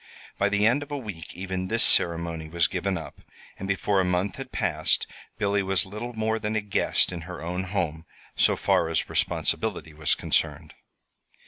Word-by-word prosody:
By 100 - +3
the 100 +1 +2
end 125 +6 +4
of 145 - -7
a 145 - -3
week 105 -10 -8
even 95 0 -3
this 115 +3 +3
ceremony 85 -2 +3
was 85 0 +2
given 100 -1 -1
up, 80 - -9 0.4
and 95 - -4
before 95 +1 +1
a - - +1
month 90 +2 0
had - - -7
passed, - - +2 0.3
Billy 100 0 +1
was 95 -2 0
little 105 +5 -6
more 110 0 0
than 105 0 -2
a 110 - +1
guest 105 -2 +1
in 85 -2 -5
her 90 - -6
own 90 +2 -3
home, 85 -4 -2 0.3
so - - +4
far 80 - +2
as 80 - 0
responsibility 95 -7 -1
was 75 0 +1
concerned. - - 0
95 Hz, 185 wpm, -26 LUFS, 85-105 Hz, 0.4 s, end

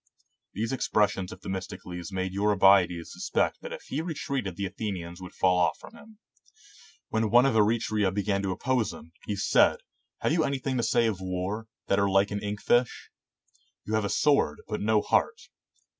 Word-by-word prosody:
These 115 +4 -2
expressions 105 -6 0
of 95 - -11
Themistocles 95 -2 -6
made 95 0 -3
Eurybiades 95 -4 +3
suspect - - -1
that - - -8
if - - -7
he 145 - -3
re 165 -1 -4
treated 125 -11 -3
the 100 +2 -3
Athenians 95 -3 -5
would 90 - -10
fall 90 -1 +3
off 90 - +2
from - - -14
him. 220 -2 -16 0.9
When 110 -1 0
one 120 +3 +6
of 135 - +2
Eretria 110 -2 +2
began 100 0 -1
to 100 - -2
oppose 125 +2 0
him, 80 - -13 0.2
he 105 - -1
said, 95 - +3 0.2
" - - -50
Have - - +1
you 165 - +1
"5 160 - +3
GREECE - - +1
anything 135 -1 -2
to - - +1
say 115 0 +2
of 105 -5 -1
war, 95 +4 -3 0.2
that 100 - +1
are 100 0 +2
like 95 +1 +3
an 100 0 -3
ink 105 0 -4
fish? 120 0 +1 0.7
You 110 - -4
have 110 -1 +1
a - - -2
sword, 120 - +2
but 105 - -3
no 105 0 +2
heart." 450 +1 +1
105 Hz, 195 wpm, -27 LUFS, 95-115 Hz, 0.9 s, one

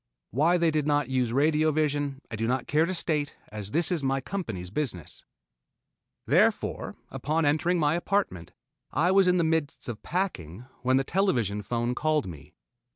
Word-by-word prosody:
Why 160 - +3
they 170 -2 +2
did 150 -1 0
not 145 -3 +1
use 125 -3 +1
radio 155 +4 +3
vision 145 -2 -1
I - - -3
do 115 +1 -2
not 130 +1 0
care 155 +3 +2
to 185 - -2
state, 150 -4 -1
as 105 -2 -5
this 165 - +3
is 170 -4 +1
my 135 0 0
company's 110 - -5
business. 110 - -4 1.0
Therefore, - - +1 0.2
upon 155 +2 -1
entering 155 +5 +2
my 150 -2 +2
apartment, 175 - -1 0.4
I 165 +6 +2
was 195 -1 +5
in 180 0 +4
the 170 - +2
midst 160 -3 -1
of 115 -3 -5
packing 125 - -3 0.2
when 130 +1 +3
the 135 - +2
television 125 - 0
phone 120 +3 -1
called 155 +2 +1
me. 75 -5 -10
145 Hz, 170 wpm, -27 LUFS, 120-165 Hz, 1.0 s, was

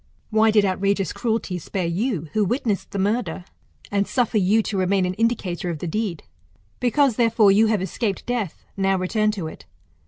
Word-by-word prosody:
Why 220 +1 +4
did 210 -1 +4
outrageous 195 -1 0
cruelty 220 -6 -2
spare 180 +2 -3
you, 175 - -1
who 215 - +2
witnessed 215 -1 -1
the 200 - -5
murder, 195 -3 -1 0.5
and 200 0 +1
suffer 240 -4 +1
you 205 +4 +3
to 210 - -4
remain 190 0 +2
an 180 - -1
indicator 195 -5 -1
of 165 - -3
the 165 - -6
deed? 190 0 -2 0.6
Because, 250 0 +2
therefore, 225 -4 +4
you 215 +3 +5
have 215 -4 +1
escaped 195 +2 -3
death, 235 -8 -3
now 195 -1 +1
return 215 +4 +1
to 190 -6 -4
it. 160 - -9
200 Hz, 180 wpm, -23 LUFS, 185-225 Hz, 0.6 s, you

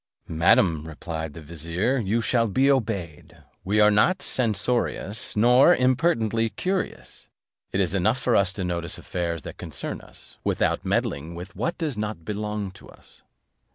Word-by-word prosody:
"Madam," 80 -1 +3
replied 80 -1 -6
the 85 - -8
vizier, 85 - -1
"you 110 +1 0
shall 115 0 +2
be 130 +8 +3
obeyed. 90 - -2 0.3
We 105 +3 +1
are 105 0 +6
not 175 - +3
censorious, 110 -2 -1
nor 125 +9 +6
impertinently 115 -4 +2
curious; 185 - -4 0.4
it 95 - -1
is 95 -2 +1
enough 105 +5 +2
for 120 -2 +1
us 100 -2 +3
to 95 - -4
notice 85 -1 -2
affairs 85 -4 -3
that - - -9
concern - - -5
us, - - -14
without - - 0
meddling 80 +4 -1
with 90 +2 -9
what 170 - -2
does 150 -8 -2
not 105 -6 -4
belong 105 -1 -3
to 95 - -15
us." - - -17
105 Hz, 155 wpm, -25 LUFS, 85-115 Hz, 0.4 s, are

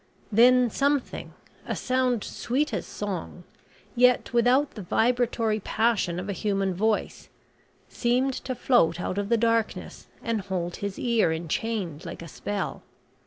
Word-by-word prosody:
Then 245 +2 +5
something 280 +1 -1 0.4
a - - -1
sound 255 -3 0
sweet 280 +5 -2
as - - -3
song 185 -3 -5 0.5
yet 250 -1 +3
without 250 +4 +3
the 215 - -8
vibratory 225 +2 +1
passion 205 -5 0
of 185 - -5
a 200 - -2
human 195 0 0
voice 215 +4 -1 0.6
seemed 255 +2 +1
to 255 0 -4
float 180 - +3
out 185 +2 -2
of 200 0 -3
the 235 - +4
darkness 230 0 -1 0.2
and 230 -3 -1
hold 180 -3 -3
his 200 -1 -4
ear 230 -8 +2
enchained 170 +1 -3
like 170 -1 -7
a - - -8
spell. 205 +5 -4
225 Hz, 140 wpm, -26 LUFS, 195-245 Hz, 0.6 s, Then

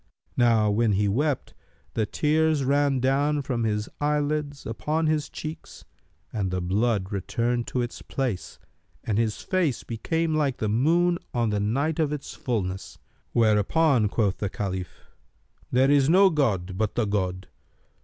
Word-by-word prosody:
Now 115 -3 +3
when 110 0 +2
he 100 +1 +2
wept, 140 +7 0 0.4
the 110 -2 0
tears 155 +1 +2
ran 140 0 +2
down 140 +3 +1
from 120 -4 -1
his 105 -1 -1
eyelids 145 -1 -1
upon 155 +8 -1
his 155 -1 0
cheeks 155 +1 -8 0.5
and 100 -4 -1
the 90 0 -1
blood 100 +2 0
returned 115 +5 -1
to 125 - -1
its 120 - -6
place 125 -9 -3 0.5
and 110 -1 0
his 110 -2 -1
face 175 -9 0
became 160 +8 -1
like 145 -4 +1
the 110 - -1
moon 170 +10 +2 0.2
on 120 -3 +1
the 105 - 0
night 140 +10 0
of 155 -2 +1
its 150 -2 -5
fulness. 95 -6 -3 0.4
Whereupon 115 +3 +3
quoth 100 -3 0
the 100 - -2
Caliph, 95 -3 -5 0.6
"There 130 +2 +4
is 140 -1 +4
no 190 +3 +6
god 95 - 0
but 110 -2 0
the 120 - +1
God! 95 -2 -2
120 Hz, 150 wpm, -26 LUFS, 105-150 Hz, 0.6 s, no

